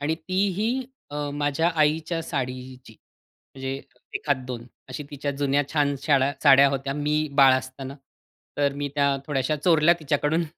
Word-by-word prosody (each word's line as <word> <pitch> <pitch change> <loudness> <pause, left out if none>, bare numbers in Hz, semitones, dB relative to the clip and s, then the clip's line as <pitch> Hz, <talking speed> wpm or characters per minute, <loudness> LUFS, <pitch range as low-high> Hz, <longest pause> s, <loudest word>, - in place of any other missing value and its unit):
आणि 150 +2 0
ती 185 +5 0
ही 240 +5 0 0.3
अ, 145 0 -3
माझ्या 145 +3 +1
आईच्या 155 +2 +1
साडीची, 130 -4 -5 0.6
म्हणजे 135 0 -4 0.4
एखाद 145 -3 0
2 120 -2 -6 0.2
अशी 150 - -5
तिच्या 145 0 -3
जुन्या 140 0 +1
छान 145 -2 +2
साडा 140 -1 +2
साड्या 140 -1 +8
होत्या, 135 0 -2
मी 150 +1 0
बाळ 135 -2 +6
असताना. 130 +1 -7 0.6
तर 140 -1 +2
मी 145 0 -2
त्या 140 -1 +3
थोड्याश्या 145 +1 0
चोरल्या 170 -1 +5
तिच्याकडून. 155 +2 0
145 Hz, 145 wpm, -25 LUFS, 135-155 Hz, 0.6 s, साड्या